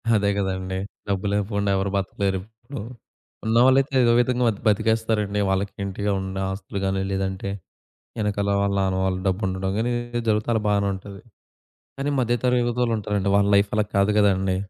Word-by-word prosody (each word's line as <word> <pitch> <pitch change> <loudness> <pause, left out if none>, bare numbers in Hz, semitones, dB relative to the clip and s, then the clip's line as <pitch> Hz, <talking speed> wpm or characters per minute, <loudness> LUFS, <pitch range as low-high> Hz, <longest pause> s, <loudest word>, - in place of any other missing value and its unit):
అదే 100 -1 +2
గదండీ. 95 -1 -2 0.3
డబ్బు 100 0 -1
లేపుండా 100 0 0
ఎవరు 95 0 -1
బతకలేరు 95 0 -1
ఇప్పుడు. 110 +5 -10 0.6
ఉన్నవాళ్ళైతే 130 +5 +4
ఏదో 120 - +4
విధంగా 125 0 +2
అది 105 - -9
బతికేస్తారండి. 110 -1 +1
వాళ్ళకి 95 +1 0
ఇంటిగా 100 +1 -2
ఉన్న 95 0 -5
ఆస్తులు 95 0 -5
గాని, 95 0 0
లేదంటే 95 0 -2 0.7
ఎనకాల 100 -1 0
వాళ్ళ 100 0 +1
నాన్న 95 -1 0
వాళ్ళు 95 -1 0
డబ్బు 95 +2 0
ఉండడం 95 0 -2
గానీ 115 +2 0
ఇలా 120 - -1
ఏదేదో 120 0 -3
జరుగుతా 105 +1 +1
అలా 110 - +1
బానే 100 -1 +2
ఉంటది. 100 +1 -10 0.8
కానీ 140 +1 -1
మధ్య 120 -1 +1
తరగతి 125 -1 +3
యువతలుంటారండి 105 -5 0
వాళ్ళ 100 0 +3
లైఫ్ 100 0 +3
అలా 105 - +3
కాదు 100 +1 +3
గదండీ! 95 -2 +2
100 Hz, 165 wpm, -24 LUFS, 95-110 Hz, 0.8 s, ఉన్నవాళ్ళైతే